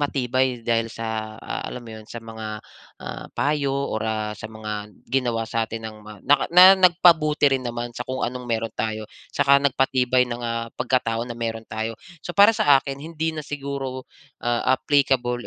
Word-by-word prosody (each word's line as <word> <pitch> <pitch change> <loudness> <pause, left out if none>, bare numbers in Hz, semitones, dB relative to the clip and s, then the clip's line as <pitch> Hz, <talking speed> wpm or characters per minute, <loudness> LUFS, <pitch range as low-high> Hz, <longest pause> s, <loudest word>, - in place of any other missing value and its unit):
matibay 130 -3 0
dahil 115 0 0
sa, 110 -1 -4
ah, - - -5
alam 125 - -6
mo 115 - -10
'yon, 110 - -11
sa 120 - -7
mga, 110 -1 -8 0.6
ah, - - -7
payo 145 -2 0
or, 140 -6 -2
ah, 110 -1 -2
sa 110 - -7
mga 105 -1 -6 0.2
ginawa 120 -3 0
sa'tin 115 0 -2
ng 110 -1 -8
mga 105 -1 -11
nak 145 -1 +6
na 185 +2 +10
nagpabuti 170 -5 +5
rin 130 -1 0
naman 120 0 -3
sa 125 - -4
kung 130 0 -3
anong 125 +1 -3
meron 115 -1 -1
tayo, 110 -1 -3 0.2
saka 140 0 +5
nagpatibay 130 -2 +2
ng, 120 0 -5
ah, 115 0 -2
pagkatao 120 -2 0
na 120 - -6
meron 115 -1 -3
tayo. 110 +1 -4 0.3
So 175 - -7
para 205 +2 +8
sa 210 -11 +5
akin, 135 0 -6
hindi 160 +1 -3
na 155 - -5
siguro, 140 -2 -5 0.4
ah, 120 0 +1
applicable 130 -3 +1
125 Hz, 180 wpm, -23 LUFS, 115-140 Hz, 0.6 s, na